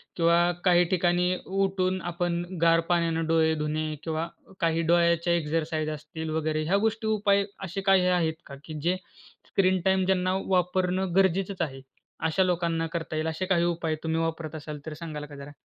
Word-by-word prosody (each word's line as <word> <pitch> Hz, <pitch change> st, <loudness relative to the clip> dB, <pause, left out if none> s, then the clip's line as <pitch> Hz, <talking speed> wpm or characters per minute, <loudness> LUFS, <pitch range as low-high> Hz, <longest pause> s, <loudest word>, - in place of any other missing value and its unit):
किंवा 170 Hz, +1 st, +4 dB
काही 175 Hz, -1 st, +5 dB
ठिकाणी 180 Hz, 0 st, +2 dB
उठून 190 Hz, -1 st, 0 dB
आपण 175 Hz, 0 st, -1 dB, 0.2 s
गार 165 Hz, 0 st, +5 dB
पाण्याने 170 Hz, -2 st, +1 dB
डोळे 160 Hz, -1 st, +3 dB
धुणे 150 Hz, +1 st, -2 dB, 0.2 s
किंवा 160 Hz, 0 st, -2 dB, 0.3 s
काही 165 Hz, 0 st, +1 dB
डोळ्याच्या 170 Hz, 0 st, +3 dB
एक्सरसाइज 155 Hz, -1 st, -1 dB
असतील 155 Hz, +1 st, -6 dB
वगैरे 155 Hz, 0 st, -1 dB
ह्या 180 Hz, +6 st, +2 dB
गोष्टी 220 Hz, +1 st, 0 dB
उपाय 200 Hz, -2 st, +3 dB, 0.2 s
असे 190 Hz, +1 st, -4 dB
काही 190 Hz, -2 st, +4 dB
आहेत 175 Hz, -3 st, +2 dB
का? 140 Hz, -, -9 dB
की 160 Hz, -, -8 dB
जे 175 Hz, +3 st, +1 dB, 0.5 s
स्क्रीन 185 Hz, -1 st, +2 dB
टाईम 190 Hz, -1 st, +3 dB
ज्यांना 185 Hz, -1 st, +1 dB
वापरणं 180 Hz, 0 st, +1 dB
गरजेचंच 190 Hz, 0 st, +2 dB
आहे. 135 Hz, -4 st, -3 dB, 0.4 s
अशा 160 Hz, +4 st, +2 dB
लोकांना 170 Hz, -2 st, 0 dB
करता 160 Hz, -1 st, -3 dB
येईल 155 Hz, +1 st, -1 dB
असे 160 Hz, +3 st, -2 dB
काही 185 Hz, -2 st, +2 dB
उपाय 165 Hz, -2 st, -1 dB
तुम्ही 160 Hz, 0 st, 0 dB
वापरत 165 Hz, -1 st, -3 dB
असाल 150 Hz, -1 st, -7 dB
तर 155 Hz, -, -4 dB
सांगाल 155 Hz, -2 st, -6 dB
का 145 Hz, 0 st, -12 dB
जरा? 140 Hz, +1 st, -9 dB
170 Hz, 170 wpm, -27 LUFS, 160-185 Hz, 0.5 s, काही